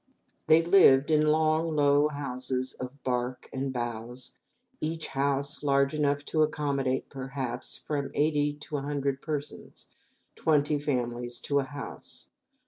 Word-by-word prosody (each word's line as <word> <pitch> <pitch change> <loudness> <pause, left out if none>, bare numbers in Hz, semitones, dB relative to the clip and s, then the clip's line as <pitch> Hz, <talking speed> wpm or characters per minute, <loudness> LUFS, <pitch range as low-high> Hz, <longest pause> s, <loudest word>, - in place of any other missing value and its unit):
They 160 +1 +6
lived 160 -6 +6
in 155 0 +4
long, 155 +1 +2
low 145 0 +4
houses 130 -3 -3
of 130 +2 -8
bark 125 0 -2
and 135 0 -2
boughs, 120 0 -5 0.5
each 160 +1 -2
house 140 +1 -1
large 140 -1 +2
enough 145 -1 0
to 155 - 0
accommodate, 140 -4 0
perhaps, 130 -2 -5
from 140 -2 -3
eighty 150 -1 +2
to 150 - -4
a - - -3
hundred 140 -1 -2
persons 150 -2 -6 0.5
twenty 150 -1 +2
families 120 -4 -2
to 140 -1 +1
a 135 - -1
house. 140 0 -8
140 Hz, 135 wpm, -28 LUFS, 130-150 Hz, 0.5 s, They